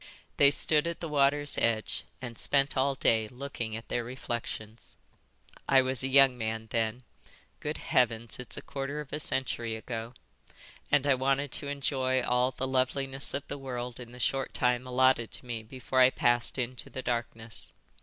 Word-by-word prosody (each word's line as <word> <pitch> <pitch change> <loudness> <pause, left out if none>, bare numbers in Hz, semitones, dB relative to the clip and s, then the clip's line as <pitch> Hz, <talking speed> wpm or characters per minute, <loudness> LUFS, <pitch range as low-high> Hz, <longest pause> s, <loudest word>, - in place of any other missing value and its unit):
They 140 - +8
stood 150 +2 +3
at 170 - -3
the 170 - -4
water's 145 0 +2
edge 110 -2 0 0.2
and 120 -2 -5
spent 140 +4 +3
all 135 +1 +2
day 110 -4 +2
looking 125 -2 -5
at 115 - -7
their 120 - -1
reflections. 120 -2 -6 0.7
I 135 -1 +6
was 130 -2 +1
a 135 - 0
young 135 -1 +6
man 110 0 -3
then—Good 115 +2 -5
Heavens, 115 -2 +1
it's 125 - -7
a - - -6
quarter 140 +2 -4
of 150 -2 -8
a 150 - -2
century 120 -5 0
ago—and 115 +4 -5
I 140 - +5
wanted 135 +1 0
to 145 - -5
enjoy 130 -2 0
all 125 +1 +2
the 130 0 -4
loveliness 135 +1 +1
of 140 - -4
the 140 - -5
world 125 -2 -5
in 120 -1 -9
the 125 - -12
short 135 +1 -1
time 125 +1 +1
allotted 130 -2 +3
to - - -6
me 120 -2 -4
before 130 +3 -3
I 130 0 +8
passed 120 -1 +1
into 125 0 -3
the 130 - -6
darkness. 115 -2 -3
130 Hz, 170 wpm, -30 LUFS, 120-135 Hz, 0.7 s, They